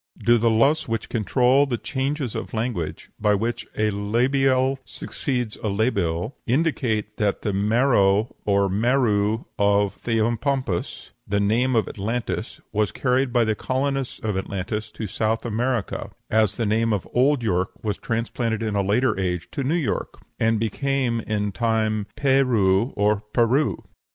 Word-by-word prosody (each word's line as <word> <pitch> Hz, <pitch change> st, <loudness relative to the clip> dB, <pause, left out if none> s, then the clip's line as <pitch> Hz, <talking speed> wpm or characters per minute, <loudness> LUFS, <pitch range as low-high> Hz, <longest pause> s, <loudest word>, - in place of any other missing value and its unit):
Do 115 Hz, +2 st, +3 dB
the 115 Hz, +1 st, +3 dB
laws 135 Hz, +8 st, +3 dB
which 115 Hz, -1 st, -3 dB
control 125 Hz, +5 st, +3 dB
the 120 Hz, -3 st, -1 dB
changes 135 Hz, 0 st, -2 dB
of -, -, -5 dB
language, 110 Hz, -8 st, -3 dB
by 105 Hz, -1 st, +3 dB
which 115 Hz, +4 st, -2 dB
a 110 Hz, 0 st, +2 dB
labial 130 Hz, +6 st, +1 dB
succeeds 125 Hz, -3 st, -4 dB
a -, -, -4 dB
labial, 100 Hz, -1 st, 0 dB
indicate 120 Hz, -6 st, 0 dB
that 105 Hz, -2 st, 0 dB
the 105 Hz, -, -1 dB
Mero 105 Hz, 0 st, +2 dB
or 100 Hz, -1 st, +2 dB
Merou 110 Hz, 0 st, +1 dB
of 100 Hz, 0 st, +3 dB
Theopompus, 115 Hz, -2 st, -1 dB, 0.2 s
the 100 Hz, 0 st, +1 dB
name 120 Hz, +5 st, +2 dB
of 110 Hz, -, +2 dB
Atlantis, 115 Hz, +4 st, -3 dB
was 105 Hz, -2 st, +1 dB
carried 130 Hz, 0 st, +1 dB
by 120 Hz, -1 st, +3 dB
the 110 Hz, -1 st, +1 dB
colonists 135 Hz, +3 st, -2 dB
of 105 Hz, -3 st, -2 dB
Atlantis 100 Hz, +3 st, -3 dB
to 110 Hz, -, -5 dB
South 110 Hz, +3 st, -1 dB
America 120 Hz, 0 st, -2 dB, 0.2 s
(as 110 Hz, -2 st, +2 dB
the 115 Hz, -, 0 dB
name 110 Hz, +2 st, +2 dB
of 100 Hz, -, -2 dB
old 130 Hz, +1 st, +3 dB
York 95 Hz, -3 st, +1 dB
was 105 Hz, -2 st, -2 dB
transplanted 115 Hz, -1 st, -2 dB
in 110 Hz, -2 st, -1 dB
a 100 Hz, -, +2 dB
later 105 Hz, +3 st, +1 dB
age 90 Hz, -2 st, -2 dB
to 140 Hz, -, -3 dB
New 145 Hz, +6 st, +1 dB
York), 165 Hz, -6 st, -2 dB, 0.2 s
and 115 Hz, -1 st, +2 dB
became 125 Hz, +1 st, 0 dB
in 105 Hz, -2 st, -2 dB
time 110 Hz, -1 st, 0 dB
Pérou 125 Hz, -6 st, +3 dB
or 105 Hz, +1 st, +2 dB
Peru? 120 Hz, +7 st, +1 dB
115 Hz, 150 wpm, -23 LUFS, 105-125 Hz, 0.2 s, Do